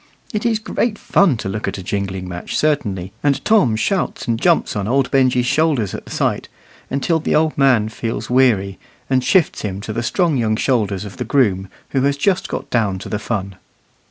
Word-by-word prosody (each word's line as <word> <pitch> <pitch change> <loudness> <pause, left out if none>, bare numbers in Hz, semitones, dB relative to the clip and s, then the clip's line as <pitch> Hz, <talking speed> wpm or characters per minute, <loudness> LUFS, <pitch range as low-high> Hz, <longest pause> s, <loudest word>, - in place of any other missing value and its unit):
It 215 +2 0
is 225 -2 +2
great 220 0 -2
fun 190 - +2
to 105 - -5
look 105 +2 -3
at - - -3
a 95 - -7
jingling 95 -1 -3
match 90 -1 -5
certainly, 100 -12 -1
and 140 -1 0
Tom 200 - +4
shouts 190 - -1
and 115 -1 -1
jumps 170 -2 +2
on 100 -1 -2
old 135 +2 +1
Benjy's 130 -2 +3
shoulders 140 - +1
at - - -7
the - - -12
sight, - - -1 0.4
until 160 +5 0
the 160 - 0
old 155 0 +2
man 130 -6 +3
feels 115 +1 -4
weary, 110 -7 +2 0.3
and 130 -1 +3
shifts 180 +3 +2
him 100 -2 -4
to 110 - -5
the 115 - -2
strong 160 +4 +1
young 110 -3 +1
shoulders 105 -6 0
of 100 - -10
the - - -2
groom, 105 -7 +1 0.2
who 135 - 0
has 140 +1 +1
just 190 +5 +1
got - - -4
down 105 -5 +1
to 95 - -8
the 105 - -2
fun. 100 -3 -4
120 Hz, 205 wpm, -19 LUFS, 100-145 Hz, 0.4 s, Tom